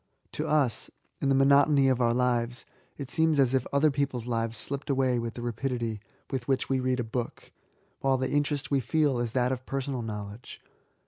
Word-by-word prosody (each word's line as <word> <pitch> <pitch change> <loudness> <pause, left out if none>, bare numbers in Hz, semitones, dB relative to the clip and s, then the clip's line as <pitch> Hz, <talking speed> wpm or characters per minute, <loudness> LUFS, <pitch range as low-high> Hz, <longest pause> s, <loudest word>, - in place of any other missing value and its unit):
To - - -3
us, 145 -7 +2 0.3
in 140 - +1
the 135 - +4
monotony 140 +1 +5
of 130 -1 +2
our 120 -1 +3
lives, 120 0 0 0.3
it 135 -4 -6
seems 160 -2 +2
as 130 -2 +3
if 130 -2 +1
other 145 +2 +3
people's 135 -4 -2
lives 115 -1 -1
slipped 140 +6 -2
away 130 -3 +2
with 115 -1 -4
the 120 - -6
rapidity 120 -2 -2 0.3
with 130 -2 -3
which 135 -2 0
we 135 - +2
88 - - -1
E86AT8. 130 - -3
read 130 0 +1
a - - 0
book, 115 +1 -5 0.5
while 135 -1 +2
the 130 0 -2
interest 145 0 -1
we 140 - +3
feel 140 +1 +1
is 120 -2 -2
that 125 0 +1
of 130 0 -4
personal 135 -2 -3
knowledge. 105 +1 -7
130 Hz, 205 wpm, -28 LUFS, 120-140 Hz, 0.5 s, monotony